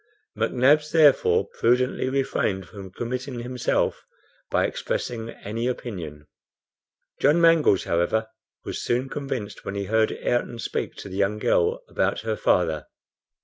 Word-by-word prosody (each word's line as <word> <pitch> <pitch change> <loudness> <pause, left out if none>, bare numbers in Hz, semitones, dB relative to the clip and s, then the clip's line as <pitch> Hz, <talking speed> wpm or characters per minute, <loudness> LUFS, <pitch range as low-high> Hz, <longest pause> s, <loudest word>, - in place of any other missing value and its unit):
McNabbs, 150 +4 +3
therefore, 150 -4 +5
prudently 125 +2 +1
refrained 130 -8 -1
from 100 -2 -10
committing 125 +4 -4
himself 125 0 -1 0.5
by - - +2
expressing 115 -2 -3
any 115 +2 -4
opinion. 85 -12 -5 0.9
John 150 +5 +4
Mangles, 165 - +5
however, 85 +6 0 0.4
was - - -4
soon 125 +3 0
convinced 135 -8 -5
when 100 - -5
he 100 - -2
heard 110 +2 +2
Ayrton 120 0 -1
speak - - -3
to - - -9
the 95 0 -7
young 100 +1 +1
girl 90 -4 +1
about - - 0
her 110 -1 -2
father. 80 -7 +1
115 Hz, 130 wpm, -25 LUFS, 100-130 Hz, 0.9 s, therefore